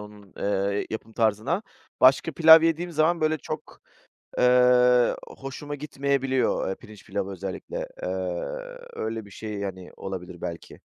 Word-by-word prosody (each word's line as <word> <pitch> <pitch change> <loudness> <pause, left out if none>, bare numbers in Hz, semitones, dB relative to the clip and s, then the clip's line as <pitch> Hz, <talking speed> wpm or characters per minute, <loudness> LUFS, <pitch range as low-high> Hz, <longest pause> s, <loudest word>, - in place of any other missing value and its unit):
onun, 105 -2 -13
eee, 100 0 0
yapım 110 0 -6
tarzına, 115 - +1 0.4
başka 135 +5 +5
pilav 160 +1 +8
yediğim 165 +1 0
zaman, 160 +2 +2
böyle, 155 0 +1
çok, - - -7 0.6
eee, 125 0 +5
hoşuma 140 +2 -7
gitmeyebiliyor. 135 -5 0
Eee, 95 - -1
pirinç 110 -4 -15
pilavı 100 -1 -3
özellikle, 280 - -5
eee, - - -2 0.8
öyle 110 0 -4
bir 100 - -15
şey, 105 0 -6
hani, 95 -2 -6
olabilir 90 -2 -7
belki. 85 0 -7
125 Hz, 130 wpm, -26 LUFS, 100-150 Hz, 0.8 s, pilav